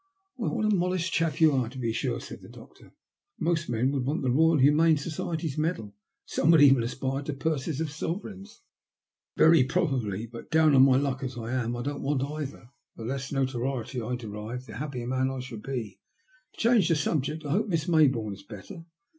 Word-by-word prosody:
'* 385 0 -50
Why, 230 - -2
what 225 -3 -1
a 215 -1 +3
modest 180 -1 -1
chap 165 -1 0
you 160 -2 +6
are, 130 -4 0
to 130 - -11
be 115 -3 -1
sure," 115 - -2
said - - -9
the - - -13
doctor. - - -15 0.5
Most 165 -1 0
men 120 +3 +1
would 140 -3 -1
want 140 +3 -1
the 130 - +1
Boyal 160 +4 +4
Humane 155 +4 +5
Society's 155 0 -3
medal, 160 -5 -1
and 100 -1 -12 0.3
some 155 - 0
would 165 -3 +7
even 135 -3 +6
aspire 130 +3 -2
to 145 +1 -4
purses 145 0 -2
of 160 -2 -2
sovereigns." 190 +6 -6 0.3
" - - -45
Very 160 -4 +6
probably. 130 - -1
But 115 0 -11
down 155 -1 +4
on 135 -1 +7
my 130 -1 +5
luck, 135 -1 -1
as 130 -2 -5
I 115 0 -5
am, 120 -2 -1
I 120 - -4
don't 145 +1 -4
want 140 -1 0
either. 140 -4 -6 0.2
The 115 - -8
less 135 +2 -4
notoriety 130 -2 -2
I 120 +3 -2
derive, 115 +2 -6
the 110 -3 -9
happier 130 -3 -4
man 130 +1 0
I 135 0 -4
shall 125 -3 -7
be. 110 -6 -5 0.6
To - - -17
change 225 -6 +4
the 165 - +4
subject, 150 +1 -1
I 145 - -3
hope 215 +7 +1
Miss 165 -5 -1
Mayboume 135 - +2
is 100 - -11
better?" 115 - -11
135 Hz, 215 wpm, -27 LUFS, 125-160 Hz, 0.6 s, would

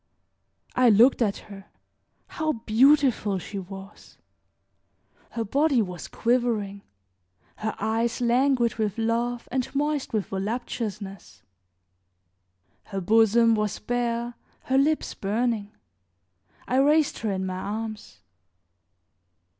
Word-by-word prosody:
I 250 -1 +5
looked 235 +5 +5
at 205 -4 +1
her; 195 0 -11 0.6
how 315 -1 -2
beautiful 235 -2 +3
she 195 +2 -6
was! 195 +1 -11 1.2
Her 230 - -1
body 280 +4 +2
was 180 -5 -3
quivering; 230 -5 0 0.8
her 220 0 -3
eyes 225 +3 -1
languid 245 -1 +2
with 215 -2 -1
love 235 +1 -1
and 255 -1 -1
moist 295 0 -1
with 215 -3 -1
voluptuousness; 200 - -5 1.4
her 195 -2 -4
bosom 225 +4 +4
was 210 -2 -1
bare, 240 +1 -2 0.3
her 265 - +1
lips 305 +3 +1
burning. 210 0 -1 1.0
I 255 - +1
raised 295 +2 +3
her 220 - -2
in 190 -1 -2
my 185 0 -4
arms. 210 - -6
225 Hz, 105 wpm, -25 LUFS, 200-245 Hz, 1.4 s, I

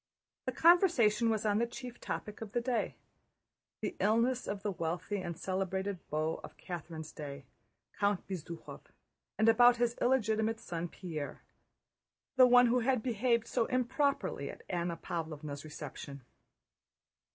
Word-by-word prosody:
The - - +1
conversation 285 - +5
was 220 -1 0
on 210 0 +3
the 235 - +1
chief 245 0 -8
topic 210 +1 -5
of 215 -3 -7
the - - +2
day: 240 0 -1 0.9
the - - -3
illness 235 +4 +2
of 200 -1 -4
the 205 - 0
wealthy 175 +3 -2
and 170 -2 -5
celebrated 190 +1 -2
beau 155 +1 -1
of - - -10
Catherine's 165 -3 -7
day, 140 -3 -7 0.5
Count 200 -2 +1
Bezúkhov, 170 -3 -7 0.6
and 220 - +3
about 240 +2 +7
his 240 0 +2
illegitimate 225 -3 +2
son 170 -3 -4
Pierre, 160 -5 -6 0.9
the 255 -1 +8
one 245 0 +7
who 245 +1 +3
had 250 -1 +1
behaved 235 -1 +1
so 235 -1 0
improperly 260 +3 0
at - - -10
Anna 170 -1 -2
Pávlovna's 155 -4 -5
reception. 140 -2 -8
210 Hz, 140 wpm, -33 LUFS, 170-240 Hz, 0.9 s, the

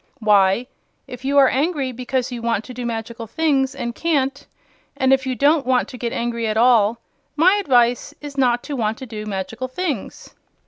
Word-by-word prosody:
"Why, 205 +1 +3 0.4
if 250 0 -10
you 280 +1 0
are 275 -1 +7
angry 280 -1 0
because 255 +1 -3
you 240 -1 -5
want 230 -2 0
to 255 - -10
do 245 0 -4
magical 230 0 -5
things 275 -1 0
and 240 -3 -4
can't, 275 -2 -1 0.5
and 265 -1 +3
if 265 0 +1
you 255 - -1
don't 290 +4 +3
want 255 0 +1
to 255 - -9
get 235 -1 -2
angry 235 -1 -2
at 215 0 -1
all, 230 -2 +4 0.4
my 340 +5 +5
advice 245 -9 +2
is 290 -1 -9
not 245 -3 +2
to 290 - -5
want 220 -2 -1
to 260 - -8
do 215 -3 -7
magical 210 +5 -4
things." 280 - -5
250 Hz, 190 wpm, -21 LUFS, 230-275 Hz, 0.5 s, are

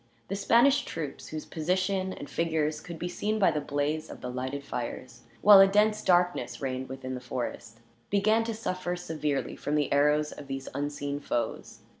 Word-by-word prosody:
The 195 - -1
Spanish 235 +7 +4
troops, 150 -4 -6
whose 155 -1 -6
position 185 +3 -1
and 145 - -7
figures 155 -2 -1
could 170 0 -8
be 175 - -3
seen 210 +4 -1
by 200 - +4
the 150 - -1
blaze 145 +2 -2
of - - -9
the 125 - -4
lighted 130 +3 -4
fires, 120 0 -6 0.2
while 205 -1 +10
a 195 - +9
dense 210 +2 +3
darkness 175 -9 +2
reigned 130 -1 -3
within 130 -1 -5
the 125 - -5
forest, 120 -2 -5 0.3
began 215 +3 +3
to 230 -1 -3
suffer 185 -5 -3
severely 155 -5 -2
from 150 - -2
the 145 -2 +1
arrows 150 +1 +3
of 145 - -10
these 135 0 -5
unseen 145 0 -3
foes. 120 -4 -3
150 Hz, 180 wpm, -28 LUFS, 135-185 Hz, 0.3 s, while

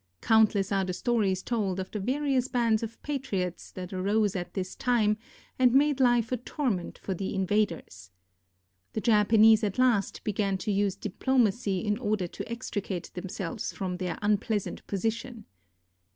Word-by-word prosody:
Countless 215 -3 +3
are 195 -1 +2
the 185 -1 -3
stories 200 -4 0
told 200 -6 -1
of 185 - -5
the 210 - -3
various 260 +3 0
bands 230 -4 +1
of 230 0 -6
patriots 200 - -3
that 185 0 -7
arose 200 +2 +1
at 175 -2 -5
this 185 -2 -3
time 225 -4 +2 0.4
and 250 -1 +5
made 285 0 +4
life 240 -3 +3
a 250 - +1
torment 245 - -3
for 195 - -4
the 190 +2 -4
invaders. 185 - -1 0.8
The 220 - -2
Japanese 220 0 +5
at 205 -2 -1
last 245 -6 +2
began 200 -2 0
to 200 +3 -2
use 200 -1 +1
diplomacy 210 -2 0
in 210 +1 0
order 210 -5 0
to 200 +6 -7
extricate 205 -6 -4
themselves 190 +2 -4
from 185 -2 -3
their 180 -2 -3
unpleasant 210 0 -1
position. 225 +3 -3
210 Hz, 150 wpm, -28 LUFS, 190-235 Hz, 0.8 s, and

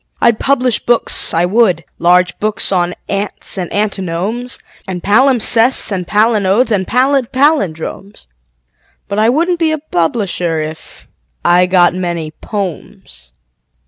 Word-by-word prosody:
I'd 235 -2 +2
publish 255 -4 0
books, 240 -1 +1
I 165 +1 +1
would 185 -4 +1
large 180 +1 +2
books 215 -1 -1
on 180 -1 0
ants 200 0 -3
and 180 - -5
antinomes 205 +4 -3 0.3
And 180 -2 -5
palimpsests 240 +1 +3
and 180 -3 -3
palinodes 215 +2 +2
and 190 -3 0
pallid 260 0 +1
pallindromes: 205 - -1 0.8
But 200 - -2
I 220 +1 +3
wouldn't 335 +6 0
be 325 -2 +1
a 315 - -1
publisher 175 - -2
if.... 155 +1 -8 0.4
I 180 +1 +4
got 180 -1 +3
many 170 -4 -4
"pomes." 180 - -7
200 Hz, 125 wpm, -14 LUFS, 180-240 Hz, 0.8 s, I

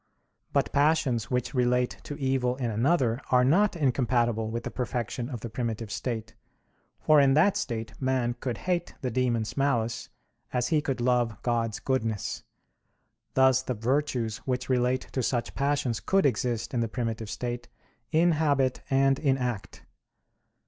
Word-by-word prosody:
But - - +1
passions 140 -6 +2
which 125 +1 -1
relate 125 -1 +1
to 145 - -5
evil 130 -3 0
in 125 -3 -2
another 120 +1 +1
are 125 -1 +5
not 195 +9 +3
incompatible 120 -6 +1
with 115 +1 -4
the - - -5
perfection 120 0 -3
of 120 -5 -6
the 120 - -5
primitive 115 -2 -3
state; 115 -1 -4 0.7
for 155 -1 +5
in 135 -1 +4
that 180 +6 +4
state 110 -3 -3
man 130 -2 +1
could 125 -2 -3
hate 175 -2 -1
the 125 - -2
demons' 120 -3 0
malice, 120 -5 0 0.4
as 125 -1 0
he 155 -3 +3
could 135 -4 -2
love 120 -3 +1
God's 115 -3 0
goodness. 115 -6 -2 0.9
Thus 130 -1 +5
the 125 -1 -3
virtues 120 -1 0
which 130 0 -3
relate 125 0 +2
to 130 - -1
such 120 0 -1
passions 140 -5 0
could 195 - +2
exist 120 -2 0
in 120 - 0
the 115 - +1
primitive 115 -3 -3
state, 120 +2 -4 0.4
in 170 +2 +4
habit 145 -5 +1
and 135 0 +3
in 135 -3 +2
act. 125 -6 -4
125 Hz, 155 wpm, -27 LUFS, 115-135 Hz, 0.9 s, are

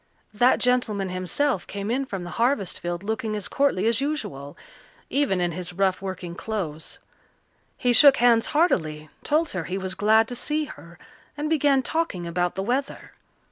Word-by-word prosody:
That 245 +4 +4
gentleman 225 -6 +1
himself 185 - -1
came 200 +2 -4
in 265 +2 -1
from 195 -5 -5
the 175 - -7
harvest 235 -7 +1
field 175 +1 -4
looking 220 0 -2
as 205 -3 -3
courtly 275 -9 +1
as 230 +2 +2
usual, 145 - -4 0.5
even 270 -9 +1
in 175 -1 0
his 180 +1 -6
rough 190 0 +1
working 185 -3 -5
clothes. 170 -6 -5 0.8
He 245 -1 +2
shook 275 +3 +7
hands 235 -1 +4
heartily, 155 - 0
told 310 +2 +1
her 180 -4 -4
he 185 - -3
was 190 -1 -3
glad 220 +3 +3
to 245 - -5
see 305 +5 -1
her, 170 - -12 0.4
and 300 +2 -2
began 285 -3 +3
talking 285 - -2
about 175 +1 -1
the 190 - -2
weather. 260 +6 -3
210 Hz, 170 wpm, -24 LUFS, 180-265 Hz, 0.8 s, shook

